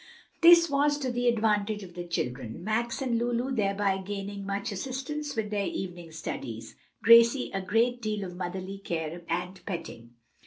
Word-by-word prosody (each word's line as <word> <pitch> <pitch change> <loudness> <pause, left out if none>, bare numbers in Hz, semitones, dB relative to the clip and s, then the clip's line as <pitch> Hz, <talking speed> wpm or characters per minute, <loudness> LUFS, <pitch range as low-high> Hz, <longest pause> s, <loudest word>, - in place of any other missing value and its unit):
This 335 0 +8
was 290 0 +2
to 265 -3 -2
the 245 0 0
advantage 215 -2 +1
of 180 -2 -11
the 175 0 -5
children, 125 -5 -3
Max 235 +5 -1
and 235 -3 +1
Lulu 240 +2 -1
thereby 200 -2 +1
gaining 200 0 -5
much 200 +1 -2
assistance 270 +8 -4
with 215 -2 -2
their 205 -2 0
evening 175 -3 -5
studies, 120 -7 -6 0.3
Gracie 235 +3 +6
a 195 - -1
great 230 +6 +1
deal 210 -2 -2
of 180 -2 -6
motherly 185 +2 -5
care 170 -2 -4
and 180 +2 -3
petting. 120 - -6
205 Hz, 160 wpm, -28 LUFS, 180-240 Hz, 0.3 s, This